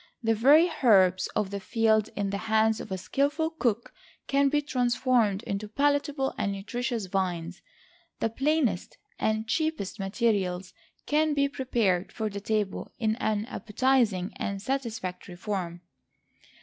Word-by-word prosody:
The 225 0 +3
very 285 +10 +6
herbs 185 -6 +5
of 205 -2 0
the 200 - -3
field 220 0 +2
in 200 -1 -1
the 200 - -2
hands 220 0 +3
of 215 - -9
a 190 - -1
skilful 285 - 0
cook 240 -8 -1 0.3
can 275 0 +3
be 295 +1 +2
transformed 245 -6 +1
into 200 0 -3
palatable 285 +3 0
and 200 - 0
nutritious 230 +2 -3
viands. 180 -2 -2 0.6
The 225 - 0
plainest 270 - 0 0.2
and 220 0 0
cheapest 315 - -1
materials 195 -3 -1 0.3
can 305 0 +2
be 280 0 +3
prepared 230 -9 0
for 220 -2 -3
the 200 0 -6
table 210 -2 -2
in 220 -1 0
an 215 -3 -1
appetizing 225 -4 +1
and 200 -1 -3
satisfactory 220 -7 -4
form. 180 -3 -4
220 Hz, 135 wpm, -28 LUFS, 195-265 Hz, 0.6 s, very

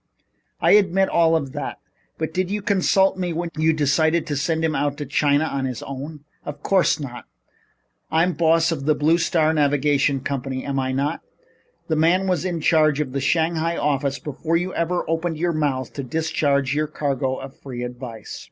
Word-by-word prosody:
"I - - +3
admit 195 -2 +4
all 165 -1 +3
of 140 -5 -1
that. - - -5 0.4
But 160 0 -3
did 185 +1 -1
you 205 0 -3
consult 195 -1 +2
me 175 -2 -1
when 170 +1 -3
you 160 +1 +3
decided 155 +2 +2
to 145 - -3
send 160 +3 0
him 160 - 0
out 145 -1 -1
to 145 - -4
China 145 +2 +2
on 140 -4 -2
his 125 -3 -4
own?" 140 +3 -7 0.2
"Of 150 0 -8
course 190 -4 +2
not. 125 -4 -7 0.8
I'm 165 +3 +2
boss 165 +1 +3
of 140 -4 -3
the 155 0 +3
Blue 160 +3 +2
Star 160 -1 +2
Navigation 145 -2 +2
Company, 135 -1 -4
am 140 -1 -1
I 130 0 -1
not? 140 +4 -1 0.7
The 160 - 0
man 170 +5 +3
was 180 -3 0
in 175 -3 -2
charge 155 -2 +3
of 145 -4 -2
the 140 +1 -2
Shanghai 165 +2 +1
office 140 -1 0
before 155 +3 -2
you 180 +2 -3
ever 175 +1 -1
opened 165 0 -1
your 170 +1 0
mouth 140 -5 -1
to 140 - -4
discharge 140 -1 0
your 150 +1 0
cargo 135 -3 -2
of 135 0 -9
free 125 -3 -6
advice." 120 -3 -7
155 Hz, 190 wpm, -22 LUFS, 140-165 Hz, 0.8 s, admit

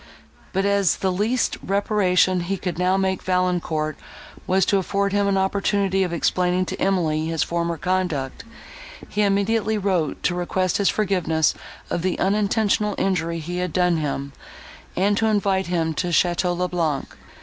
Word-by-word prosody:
But, 195 +1 0
as 200 -2 +2
the 190 - -1
least 220 +7 0
reparation 190 -2 +2
he 185 +3 -2
could 180 -2 -4
now 185 +1 +2
make 190 -1 0
Valancourt 175 -4 -1 0.5
was 190 0 +3
to 200 - +2
afford 200 +1 -1
him 205 0 +2
an 195 -1 +2
opportunity 195 0 +1
of 180 -2 0
explaining 180 +2 +1
to - - -6
Emily 160 -5 +1
his 165 -1 0
former 170 0 -2
conduct, 180 -7 -2 0.7
he 210 - -1
immediately 210 +2 +1
wrote, 185 -6 -1
to 180 - +1
request 180 +1 0
his 200 - +2
forgiveness 180 -6 +1 0.4
of 175 - -1
the 185 +1 -1
unintentional 210 +1 +1
injury 170 -3 0
he 175 +2 -5
had 180 -3 -2
done 180 -2 +2
him, 140 -2 -3 0.6
and 200 +2 +2
to 225 - +2
invite 195 -3 +1
him 165 -2 0
to 180 +4 -2
Château 175 +1 +1
le 180 0 0
Blanc. 165 -6 -2
185 Hz, 160 wpm, -22 LUFS, 170-200 Hz, 0.7 s, was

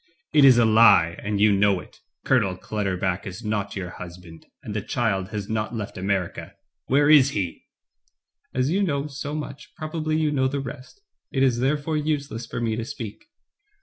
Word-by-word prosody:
"It 150 - +6
is 130 -3 +8
a 120 - +5
He, 110 -7 +5
and 105 0 -2
you 105 +1 +5
know 100 -1 +3
it. - - -14 0.3
Colonel 105 -9 +2
Clutter 100 -1 -2
buck 95 +1 -2
is 95 +4 -8
not 100 -2 -2
your 90 -3 -5
husband, 85 -2 -11 0.2
and 105 - -6
the 105 - -1
child 100 -5 -1
has 105 -1 -5
not 110 +1 -2
left 105 -3 -5
America. 95 -1 -3 0.3
Where 145 +2 +3
is 145 -3 +7
he?" 90 -4 -4 0.8
As 130 +3 0
you 195 +3 +1
know 145 -7 0
so 145 0 -5
much, 150 -2 -7
probably 155 -1 -2
you 155 -1 +1
know 130 -2 +2
the 140 +1 -2
rest. 135 - -9 0.3
It 135 -2 +1
is 125 -3 +2
therefore 145 +4 0
useless 140 -6 -2
for - - -5
me 115 -2 -1
to 115 - -2
speak." 115 - -8
115 Hz, 185 wpm, -24 LUFS, 100-140 Hz, 0.8 s, is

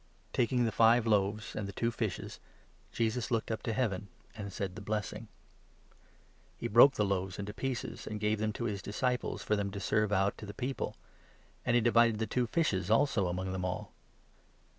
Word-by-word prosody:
Taking 125 0 +2
the 115 - 0
five 115 +2 +5
41 115 - 0
loaves 105 +2 -5
and 105 -2 -3
the - - -5
two 115 +4 0
fishes, 110 -4 -4 0.5
Jesus 115 +2 -1
looked 115 -2 0
up 110 - -2
to 115 - -2
Heaven, 105 -4 -1 0.3
and 100 -3 -6
said 95 -1 -3
the 110 - -8
blessing; 105 +1 -3 1.3
he - - -3
broke 120 +4 +7
the 105 - +2
loaves 95 -1 -1
into 105 0 -5
pieces, 130 +2 -4
and 105 - -4
gave 105 0 +1
them 110 0 0
to 120 - -4
his 105 -4 -2
disciples 125 +5 -1
for 105 - +1
them 100 -1 -1
to 100 0 -6
serve 105 0 +1
out 95 0 +1
to 105 - -8
the 100 - -8
people, 130 +2 -3 0.7
and 120 - +2
he 120 - +5
divided 115 -1 +4
the 110 - 0
two 125 +1 0
fishes 105 - 0
also 115 -4 +3
among 95 +2 -2
them 95 -1 -3
all. 90 0 -3
110 Hz, 195 wpm, -32 LUFS, 100-115 Hz, 1.3 s, broke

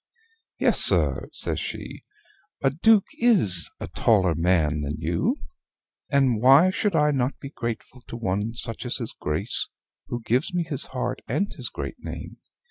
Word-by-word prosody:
"Yes, - - +3
sir," - - +1
says - - 0
she, - - -7 0.6
"a 135 - +3
Duke 205 - +4
IS 175 - +5
a - - -5
taller 95 -6 +2
man 80 -2 +1
than 75 +1 -3
you. 85 -2 -1 0.7
And 130 -6 +2
why 140 +9 +6
should 205 +2 -1
I 150 0 +3
not 135 -1 -1
be 140 - -8
grateful 115 0 -6
to 115 - -7
one 105 +1 -2
such 115 -1 -6
as 125 0 -1
his 115 -4 -5
Grace, 75 0 -2 0.4
who 120 -1 -5
gives 130 - 0
me 175 - +1
his 150 -5 0
heart 125 0 -4
and 200 +1 -1
his - - -4
great - - -6
name? - - -7
125 Hz, 160 wpm, -25 LUFS, 95-145 Hz, 0.7 s, why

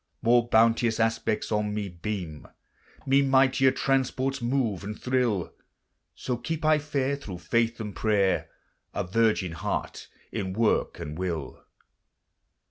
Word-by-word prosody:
More 120 0 +4
bounteous 115 0 +3
aspects 115 -1 0
on 105 -1 0
me 105 -1 -2
beam, 85 -3 -6 0.6
Me 135 +1 +4
mightier 135 -1 +4
transports 135 0 0
move 120 -6 0
and 105 +2 -6
thrill; 125 -8 0 0.6
So 125 -2 -3
keep 160 +4 -4
I 155 -1 +5
fair 140 -2 -1
thro' 105 -10 -8
faith 115 +7 0
and 105 -3 -5
prayer 100 -3 +1 0.5
A - - 0
virgin 105 -2 +1
heart 85 - -4 0.2
in 95 -1 -3
work 110 +1 +1
and 75 +3 -6
will. 85 -6 -4
115 Hz, 125 wpm, -27 LUFS, 100-130 Hz, 0.6 s, I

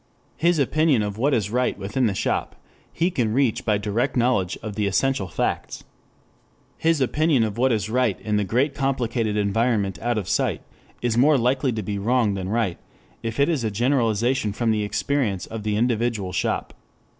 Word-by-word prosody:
His 170 +2 +2
opinion 145 -3 +2
of 105 +1 -4
what 140 +5 +2
is 105 -6 0
right 125 +1 0
within 110 +6 0
the 100 - -1
shop - - -1 0.4
he 175 +3 0
can 115 -8 0
reach 130 -3 +1
by 105 -2 +2
direct 105 +6 -1
knowledge 120 -7 +1
of 110 -2 -5
the 105 0 -1
essential 100 +1 +1
facts. - - -3 1.0
His 165 -1 +2
opinion 145 -1 +2
of 110 0 -3
what 130 +1 +3
is 105 -3 0
right 125 +3 +1
in 105 -1 -2
the 105 - +2
great 125 +8 +1
complicated 120 -6 -1
environment 105 -2 0
out 120 0 0
of 100 -4 -3
sight - - 0 0.4
is 120 -1 +1
more 145 +3 +5
likely 130 +2 +1
to 110 -1 -3
be 100 +1 -3
wrong 115 0 +2
than 95 -1 -4
right 110 -5 -1 0.4
if 115 +3 -4
it 140 - +4
is 155 -8 0
a 110 - 0
generalization 120 0 +1
from 115 +1 0
the 110 -1 +1
experience 105 -2 -1
of 115 -1 -6
the 105 0 -1
individual 115 -4 0
shop. - - -2
115 Hz, 185 wpm, -23 LUFS, 105-130 Hz, 1.0 s, more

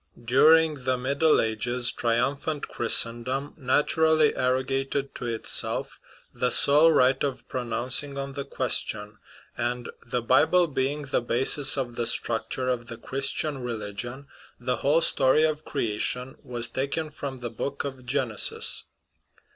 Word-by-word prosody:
During 155 +3 +3
the 130 -1 0
Middle 140 +5 +1
Ages 120 +3 0
triumphant 135 +6 -2
Christendom 120 +4 +1
naturally 155 +3 +2
arro 130 +1 -1
gated 135 +1 -3
to 120 - -7
itself 115 -1 +1 0.3
the - - -1
sole 150 +3 +6
right 130 -3 +2
of 140 -2 -4
pronouncing 130 +3 0
on 140 0 -5
the 140 0 -5
ques 130 -2 0
tion; 105 0 -9 0.4
and, 120 0 -4
the 120 0 -4
Bible 175 +8 +3
being 145 0 -2
the 135 -2 -2
basis 135 +4 +3
of 120 -3 -4
the 120 - +1
structure 120 +3 -2
of 120 -2 -2
the 115 - -8
Christian 135 +3 -3
religion, 120 +2 -6 0.3
the 125 +1 -2
whole 150 +4 +1
story 135 0 +3
of 155 -1 -1
creation 125 +1 -2
was 120 -4 +1
taken 140 +6 -2
from 135 -3 -7
the 120 -1 -5
book 140 +5 -4
of 135 -2 -7
Genesis. 125 -4 +1
130 Hz, 140 wpm, -25 LUFS, 120-140 Hz, 0.4 s, sole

